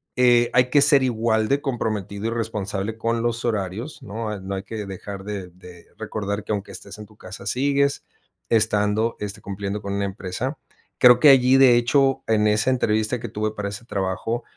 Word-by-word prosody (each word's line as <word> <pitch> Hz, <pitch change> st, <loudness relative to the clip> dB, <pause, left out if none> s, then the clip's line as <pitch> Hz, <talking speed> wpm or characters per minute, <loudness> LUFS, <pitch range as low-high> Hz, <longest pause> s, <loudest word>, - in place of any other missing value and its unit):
Eh, 120 Hz, -1 st, +4 dB
hay 125 Hz, 0 st, +4 dB
que 145 Hz, +2 st, +4 dB
ser 140 Hz, -1 st, +5 dB
igual 110 Hz, -3 st, +1 dB
de 140 Hz, +1 st, +1 dB
comprometido 110 Hz, -5 st, -3 dB
y -, -, 0 dB
responsable 110 Hz, -2 st, -3 dB
con 115 Hz, 0 st, -1 dB
los 120 Hz, 0 st, -2 dB
horarios, 110 Hz, -, -3 dB
¿no? 105 Hz, 0 st, -5 dB
No 95 Hz, +1 st, -5 dB
hay 95 Hz, -, -5 dB
que 110 Hz, -1 st, -6 dB
dejar 95 Hz, 0 st, -8 dB
de 100 Hz, -3 st, -6 dB
de 90 Hz, -1 st, -15 dB
recordar 100 Hz, 0 st, -4 dB
que -, -, -6 dB
aunque 100 Hz, -2 st, -3 dB
estés 100 Hz, +1 st, -8 dB
en 105 Hz, -, -8 dB
tu 110 Hz, -, -21 dB
casa 95 Hz, 0 st, -10 dB
sigues 140 Hz, +1 st, +1 dB, 0.5 s
estando, 110 Hz, 0 st, +1 dB
este, 105 Hz, -1 st, -5 dB
cumpliendo 100 Hz, +1 st, -5 dB
con 100 Hz, -1 st, -4 dB
una 100 Hz, 0 st, -1 dB
empresa. 100 Hz, +8 st, -4 dB, 0.4 s
Creo 125 Hz, -1 st, +7 dB
que 150 Hz, -, +7 dB
allí, 130 Hz, -1 st, +6 dB
de 130 Hz, -3 st, +6 dB
hecho, 135 Hz, +2 st, +2 dB
en 110 Hz, -1 st, +2 dB
esa 110 Hz, +4 st, +2 dB
entrevista 110 Hz, -2 st, +1 dB
que 120 Hz, -1 st, -6 dB
tuve 105 Hz, +1 st, -2 dB
para 105 Hz, -1 st, -4 dB
ese 100 Hz, +3 st, -7 dB
trabajo 100 Hz, +3 st, -3 dB
110 Hz, 190 wpm, -23 LUFS, 100-120 Hz, 0.5 s, Creo